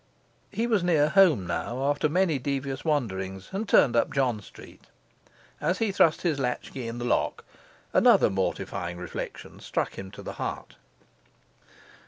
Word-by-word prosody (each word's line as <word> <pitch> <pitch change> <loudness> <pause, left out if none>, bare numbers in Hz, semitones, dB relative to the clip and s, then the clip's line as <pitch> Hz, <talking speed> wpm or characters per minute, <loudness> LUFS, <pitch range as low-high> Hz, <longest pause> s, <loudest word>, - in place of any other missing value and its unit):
He 230 - -1
was 220 -6 +1
near 155 -4 +3
home 160 - +5
now, 120 +9 -3
after 145 +2 +1
many 170 -3 +2
devious 135 0 -3
wanderings, 95 - -2
and 200 +2 -3
turned 120 - +5
up 115 - +2
John 125 -6 0
Street. - - -15 0.8
As 175 +5 +1
he 220 -1 0
thrust 165 -4 +3
his 160 -5 0
latchkey 125 -1 -3
in 115 +1 -5
the 120 - -4
lock, 120 - 0 0.5
another - - +5
mortifying 90 -2 -2
reflection 90 - -7
struck - - -3
him 95 0 -7
to 100 - -11
the - - -6
heart. - - -5
135 Hz, 150 wpm, -27 LUFS, 115-165 Hz, 0.8 s, home